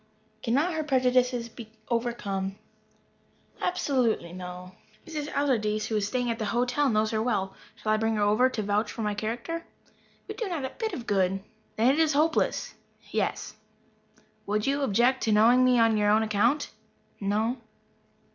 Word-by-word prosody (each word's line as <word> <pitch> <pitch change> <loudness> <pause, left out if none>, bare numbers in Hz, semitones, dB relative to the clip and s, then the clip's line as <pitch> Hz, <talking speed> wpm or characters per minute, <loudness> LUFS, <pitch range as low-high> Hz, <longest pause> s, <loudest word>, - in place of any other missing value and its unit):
"Cannot 285 +11 +1
her 315 -1 -1
prejudices 250 -3 +2
be 225 -1 -11 0.2
overcome?" 205 -5 -2 1.1
"Absolutely 250 - 0
no." 180 0 -8 0.3
"Mrs. 305 -3 -5
Allardyce, 215 -7 0
who 220 - -2
is 205 -1 +1
staying 245 +1 -1
at 230 - -4
the 215 - -1
hotel, 245 +6 +1
knows 215 -1 +1
her 220 -1 0
well. 200 -5 -1 0.2
Shall 215 -1 -2
I 215 - +3
bring 225 0 0
her 210 - +1
over 215 +5 +4
to 220 -4 -3
vouch 205 +1 0
for 225 - -5
my 210 0 0
character?" 235 +11 -4 0.6
"It - - -7
would 435 - -1
not 335 -5 -2
do - - -3
a - - -3
bit 445 -4 -4
of 245 -8 -5
good." 195 -2 +1 0.3
"Then 235 +4 +4
it 300 - 0
is 315 -2 +3
hopeless." 310 +3 +1 0.4
"Yes." - - -2 0.9
"Would 210 +1 0
you 280 +1 +1
object 250 +2 +2
to 220 - +1
knowing 230 +4 +5
me 255 -1 +4
on 225 -1 +4
your 205 0 +2
own 215 +1 +4
account?" 220 +7 +1 0.5
"No." 215 +5 0
230 Hz, 170 wpm, -27 LUFS, 210-260 Hz, 1.1 s, knowing